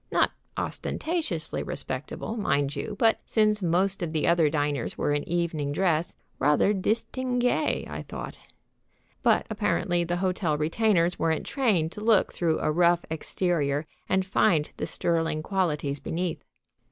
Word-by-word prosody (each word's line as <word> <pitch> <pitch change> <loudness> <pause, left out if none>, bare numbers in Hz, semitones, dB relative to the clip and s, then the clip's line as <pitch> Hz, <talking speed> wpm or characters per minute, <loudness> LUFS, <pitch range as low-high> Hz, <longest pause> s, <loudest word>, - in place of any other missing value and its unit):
Not - - +3 0.3
ostentatiously 310 - -2
respectable, 135 - -5
mind 145 -9 0
you, 175 +9 -4
but, 225 +1 +3
since 215 -1 +2
most 185 +3 +1
of 165 -2 -3
the 155 - +1
other 170 -3 +4
diners 145 -4 -1
were 145 - +1
in 145 - 0
evening 165 -4 -1
dress, 170 0 +1 0.2
rather 150 +8 +3
distingué, 245 +7 0
I - - -5
thought. - - -7 0.9
But - - +3
apparently 175 -2 +1
the 175 +1 -1
hotel 180 -4 0
retainers 170 +2 +2
weren't 160 -1 0
trained 205 - +1
to 210 - -8
look 215 -2 +3
through 165 -2 +1
a - - +1
rough 175 +1 +3
exterior 160 -3 0 0.2
and 190 0 +2
find 165 -5 +2
the - - -3
sterling 165 -2 0
qualities 150 -7 -1
beneath. 170 +3 -3
170 Hz, 140 wpm, -27 LUFS, 155-195 Hz, 0.9 s, other